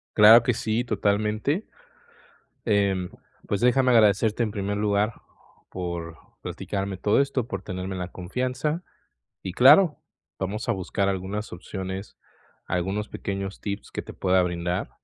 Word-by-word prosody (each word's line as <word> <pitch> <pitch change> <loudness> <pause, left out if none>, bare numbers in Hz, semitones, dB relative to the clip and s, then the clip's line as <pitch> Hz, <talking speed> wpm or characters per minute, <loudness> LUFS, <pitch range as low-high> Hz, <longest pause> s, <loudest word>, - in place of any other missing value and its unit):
Claro 110 +2 +9
que 125 - +2
sí, 110 +1 -1
totalmente. 105 - 0 1.0
Em, 100 -4 +1 0.4
pues 100 - -1
déjame 125 +1 +4
agradecerte, 110 0 +4
en 105 - -2
primer 100 0 -2
lugar, 105 +1 +1 0.6
por, 85 -2 -5 0.2
platicarme 100 -1 -4
todo 105 +8 +3
esto, 135 -4 -1
por 95 -4 -4
tenerme 95 0 -5
la 90 0 -4
confianza. 130 - -2 0.6
Y 95 - -5
claro, 150 - +7 0.4
vamos 105 +5 -3
a - - +5
buscar 100 0 -1
algunas 100 +3 -3
opciones, 95 +2 -6 0.5
algunos 95 +4 -2
pequeños 100 0 -5
tips 100 0 -5
que - - -4
te - - -10
pueda 95 0 +2
brindar. 90 0 -2
100 Hz, 130 wpm, -25 LUFS, 95-115 Hz, 1.0 s, Claro